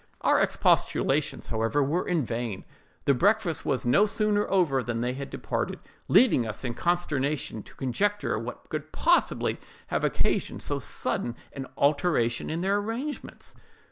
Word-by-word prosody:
Our - - +4
expostulations, - - +1
however, 115 +6 0
were 165 +7 -1
vain; 120 - -2 0.4
the 140 - +5
breakfast 195 - +1
was 130 - +1
no 195 +13 +4
sooner 210 0 +1
over 165 -9 +2
than 120 -2 -3
they 125 +1 -1
departed, 135 +1 -3 0.3
leaving 135 - +5
us 110 +3 -6
in 120 - -2
consternation 150 -7 -1
to - - -16
conjecture 205 - 0
what 115 +2 -7
could - - -5
possibly - - +2 0.3
have - - -1
occasioned - - 0
so - - -1
sudden 120 - -2 0.2
an 135 -1 -6
alteration 140 -5 +1
in 160 +2 -2
their 195 +2 +2
arrangements. 235 +8 -5
145 Hz, 140 wpm, -27 LUFS, 120-195 Hz, 0.4 s, the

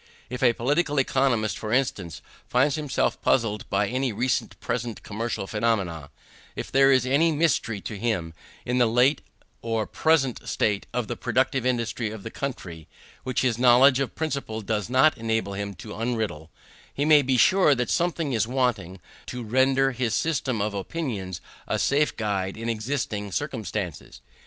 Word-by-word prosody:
If 125 - -5
a 120 -3 +5
political 145 +6 0
economist, 130 -5 +1
for 110 - -5
instance, 110 - -1 0.2
finds 135 +4 +2
himself 150 -2 -1
puzzled 110 -4 0
by 100 +1 +1
any 130 +3 -1
recent 120 +4 -1
or - - -37
present 115 -1 -4
commercial 110 -1 -3
phenomena; 95 -9 -1 0.5
if - - -6
there 135 0 +5
is 130 -2 +3
any 145 +6 +3
mystery 145 -9 0
to 105 0 -6
him 95 -8 -1 0.3
in 125 +1 0
the 120 - +5
late 125 +5 +3 0.4
or 115 -2 -1
present 140 -1 +1
state 105 -2 0
of 125 -3 -2
the 120 - -3
productive 130 +1 0
industry 115 -2 -1
of 105 -2 -8
the 115 - -7
country, 85 - -6 0.4
which 130 -1 -1
his 120 -3 0
knowledge 130 +2 +6
of 135 - -2
principle 140 -8 -3
does 105 0 -2
not 130 +3 +4
enable 110 -3 -1
him 100 0 -4
to 115 - -11
unriddle; 110 -9 -3 0.4
he 145 - -1
may 150 -1 +7
be 130 -1 +1
sure 185 +1 +5
that 125 -1 -2
something 170 -5 0
is 110 -2 +1
wanting 115 -8 -1 0.3
to 125 -1 -5
render 130 +4 +2
his 120 -2 -1
system 130 -9 0
of 105 0 -2
opinions 100 - -4 0.3
a - - 0
safe 145 +2 +1
guide 100 -3 -2
in 115 +1 -4
existing 110 -3 -3
circumstances. 110 - -4
120 Hz, 165 wpm, -25 LUFS, 105-135 Hz, 0.5 s, may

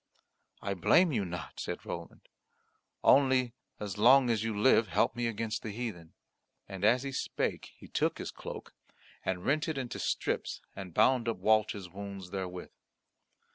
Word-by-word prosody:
"I 100 - -1
blame 165 - +4
you 105 -7 0
not," 85 -1 -7
said - - -5
Roland, - - -7 0.8
"only 130 -3 +4 0.3
as 105 -1 -5
long 125 +2 +6
as 110 -2 0
you 110 -2 -2
live 115 -1 +5
help 95 +2 +1
me 120 -1 -1
against 115 0 -3
the 110 - -5
heathen." 105 -7 -6 0.5
And 95 -1 -7
as 120 +5 +4
he 140 - -4
spake - - -3
he - - -13
took - - 0
his - - -5
cloak - - -8 0.5
and 90 -1 -2
rent 155 +4 +1
it 160 -3 -2
into 130 -3 -4
strips - - -1 0.2
and 95 -4 -8
bound 125 -3 +4
up 115 - -2
Walter's 105 -3 +2
wounds 95 0 -8
therewith. 90 -2 -5
110 Hz, 160 wpm, -31 LUFS, 95-125 Hz, 0.8 s, long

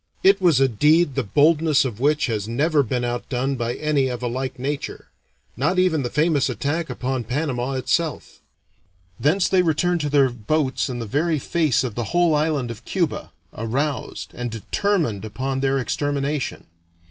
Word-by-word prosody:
It 195 +1 +5
was 170 -7 +4
a 135 - +5
deed 150 +6 +3
the - - 0
boldness 150 +5 +3
of 115 -4 -4
which 150 +3 +2
has 110 -5 -2
never 145 +6 +2
been 125 -1 -1
outdone 125 +2 -2
by 120 -1 -2
any 150 -3 +1
of 125 -1 -4
a - - 0
like 130 +2 -3
nature 140 +3 -4 0.5
not 160 +8 0
even 180 -5 +3
the 120 - -2
famous 150 -1 +2
attack 145 +8 -2
upon 130 -1 -2
Panama 130 +1 -2
itself. 155 +4 -2 0.8
Thence 175 +6 +2
they 185 - +3
returned 170 +1 +1
to 150 - -1
their 140 -3 +4
boats 130 +5 -1
in 125 - -4
the 115 - -4
very 155 +8 0
face 155 -1 +1
of 125 -4 -3
the 120 +1 -3
whole 175 -2 +4
island 150 -5 0
of 115 0 -10
Cuba, 170 0 -2 0.2
aroused 135 +6 -3
and 120 0 -4
determined 115 - -1
upon 130 +5 -3
their 135 0 +1
extermination. 140 +1 -2
140 Hz, 170 wpm, -22 LUFS, 125-155 Hz, 0.8 s, It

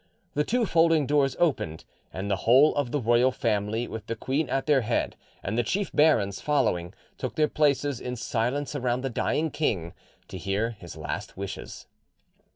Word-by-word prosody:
The 150 - +1
two 240 +7 +1
folding 165 -4 +3
doors 140 -1 +2
opened, 135 - 0 0.3
and 95 +3 -4
the 100 -1 +1
whole 130 +10 +5
of 145 -4 -1
the 145 - -1
royal 120 +2 +3
family, 110 -2 -1
with 110 0 -7
the 115 - -2
queen 135 +6 -1
at 135 0 0
their 145 -3 +4
head 115 +1 -1 0.3
and 100 - -2
the 120 - +3
chief 190 - -1
barons 110 -11 +3
following, 110 - 0 0.2
took - - -4
their 155 -1 +3
places 145 -3 +1
in 125 0 -4
silence 125 +5 -1
around 125 -2 0
the 135 -1 -3
dying 155 +6 0
king 90 - -1 0.4
to 95 - -7
hear 100 +5 -1
his 90 -7 -11
last 80 - -5
wishes. 100 0 -7
125 Hz, 175 wpm, -27 LUFS, 105-145 Hz, 0.4 s, whole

